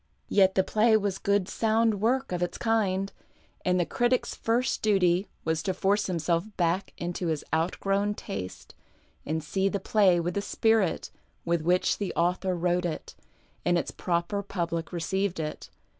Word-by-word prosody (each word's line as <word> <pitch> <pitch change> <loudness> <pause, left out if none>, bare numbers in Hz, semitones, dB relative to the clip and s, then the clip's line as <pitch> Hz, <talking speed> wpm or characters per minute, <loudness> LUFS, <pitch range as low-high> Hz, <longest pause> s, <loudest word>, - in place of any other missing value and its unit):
Yet 190 -2 +4
the 190 - +4
play 220 +3 +4
was 200 -2 -2
good, 200 -2 +1
sound 220 -2 +1
work 260 +3 +1
of 180 -1 -2
its 175 - -2
kind, 200 -4 0 0.5
and 180 0 +2
the 175 - +2
critic's 240 +9 +1
first 240 +3 0
duty 190 -3 +3 0.2
was 160 0 0
to 185 +3 -2
force 200 +2 +1
himself 170 -1 0
back 175 +2 0
into 175 +1 -3
his 155 -2 -1
outgrown 195 +5 0
taste 95 - -7 0.5
and 160 +1 -1
see 190 +5 0
the 200 - -2
play 190 -3 +3
with 175 +1 -2
the 200 - -1
spirit 220 -3 +1 0.3
with 170 -1 +1
which 180 +3 +2
the 200 - -3
author 180 +2 +1
^vrote 175 +1 +1
it 165 - -4 0.5
and 175 0 +3
its - - -2
proper 175 +3 -1
public 170 -4 -3
received 190 +1 -1
it. 150 -1 -5
185 Hz, 160 wpm, -28 LUFS, 170-205 Hz, 0.5 s, Yet